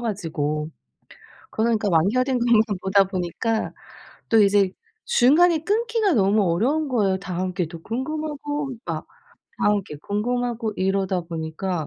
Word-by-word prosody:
가지고. 160 -9 -2 0.8
그러다 220 +2 0
보니까 215 -2 +1
완결된 250 - +2
것만 235 -2 +4 0.2
보다 195 +1 +4
보니까 190 +4 -2 0.6
또 225 -2 +5
이제 200 -1 +3 0.4
중간에 335 - +4
끊기가 445 0 +1
너무 205 -1 +3
어려운 280 - +1
거예요. 205 -7 +1
다음 185 -1 -4
게 180 -2 -1
또 165 0 -10
궁금하고 290 - -3
막 - - -4 0.5
다음 205 -1 +2
게 150 -5 -9
궁금하고 230 - -2
이러다 190 -1 0
보니까 165 +1 -4
210 Hz, 295 characters per minute, -23 LUFS, 185-255 Hz, 0.8 s, 또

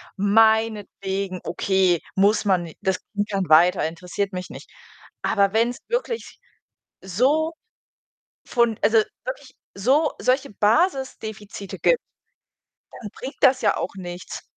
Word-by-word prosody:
meinetwegen, 205 -2 +1
okay, 185 -1 +1
muss 200 +3 +3
man 185 -3 +2
ni 165 - -11
das 190 -1 0
Kind 205 0 -2
kann 195 -4 -2
weiter, 165 0 +5
interessiert 180 +4 -4
mich 180 0 -5
nicht. - - -11 0.5
Aber 200 0 +2
wenn's 235 +3 +1
wirklich 475 -1 -3 0.6
so 270 - +1 0.9
von 235 -3 +1
also, 225 0 +4 0.3
wirklich 265 +1 -7 0.2
so 270 +10 +2
solche 260 +2 +1
Basisdefizite 215 - -1
gibt, - - +3 1.0
dann 210 - -7
bringt 265 +2 -8
das 265 -1 +5
ja - - +2
auch - - -4
nichts. 180 -1 -7
205 Hz, 120 wpm, -23 LUFS, 190-255 Hz, 1.0 s, weiter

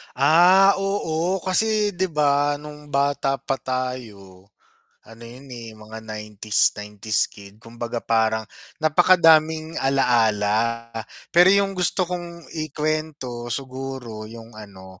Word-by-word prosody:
Ah, 175 +8 +6
oo, 185 -2 -1
kasi, 210 +2 +1
'di 190 0 -1
ba 145 -2 +1
nung 150 0 -11
bata 140 -1 0
pa 135 0 -4
tayo, 110 -8 -6 0.5
ano 115 +1 -14
yun, 125 +4 -12
eh, 115 -3 -9
mga 110 +1 -11
90s, 105 -1 0
90s 105 +1 -1
kid, 100 0 -14
kumbaga 115 +1 -7
parang, 110 -1 +1 0.3
napakadaming 160 -1 +3
alaala 115 -3 +1 0.4
pero 175 +2 +7
yung 200 0 +3
gusto 185 0 +1
kong 175 -1 -7 0.2
ikuwento 150 -5 -3
siguro 130 -3 -6
yung 115 0 -12
ano, 95 -3 -13
135 Hz, 110 wpm, -22 LUFS, 110-160 Hz, 0.5 s, pero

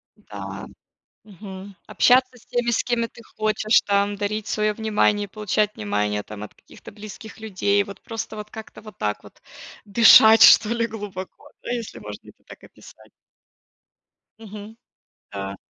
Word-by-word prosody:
М-да. - - -9 0.6
Мгм. 195 -1 -11
Общаться 255 0 +3
с 235 - -20
теми, 245 -1 -1
с 235 - 0
кем 240 -1 0
ты 230 0 -16
хочешь 215 +1 +2
там, 200 0 +1
дарить 205 +1 -3
свое 215 0 0
внимание, 210 -1 +1
получать 210 +1 -1
внимание 105 0 -2
там 105 0 -10
от 105 - -9
каких-то - - -15
близких 215 +1 -11
людей, 205 -1 0
вот 200 0 -11
просто 225 -1 -6
вот 210 0 -8
как-то 220 -1 -11
вот 215 0 -13
так 105 -1 -2
вот - - -17 0.5
дышать 220 +1 +7
что 215 - +8
ли 230 0 0
глубоко, 205 -4 -9
да, - - -7
если 235 -3 -5
можно - - -10
это - - -19
так - - -14
описать. - - -17 1.3
Мгм. 215 0 -11 0.5
Да. 100 -1 -6
210 Hz, 150 wpm, -22 LUFS, 200-220 Hz, 1.3 s, что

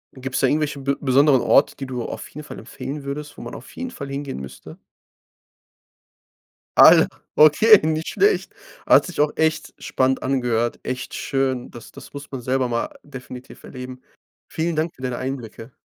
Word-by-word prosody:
Gibt's 130 0 -3
da 135 - +4
irgendwelche 150 0 -1
be 140 0 -1
besonderen 135 0 +4
Orte, 140 - +3
die 135 - -7
du 125 -2 -4
auf - - -7
jeden 150 +1 -10
Fall - - -9
empfehlen 145 +1 -7
würdest, 145 +2 -6
wo - - -9
man - - -8
auf - - -12
jeden 255 0 -5
Fall 140 - -8
hingehen 140 - -5
müsste? 65 -1 -10 2.0
Alle. - - +8 0.3
Okay, 190 +8 +7
nicht 160 0 -1
schlecht. 415 +2 +1 0.3
Hat - - +6
sich 180 - -8
auch 150 - +2
echt 160 0 0
spannend 130 0 0
angehört 120 -3 0
echt 130 0 -5
schön. 135 -2 -2
Das 120 - -12
das - - -13
muss 140 0 -9
man 135 -2 -5
selber 130 +1 0
mal 115 -1 -2
definitiv 130 -2 -11
erleben. 125 0 -9 0.5
Vielen 165 +1 -2
Dank 160 +2 -1
für - - -17
deine 125 -2 -3
Einblicke. 125 -2 -6
135 Hz, 170 wpm, -22 LUFS, 125-150 Hz, 2.0 s, Alle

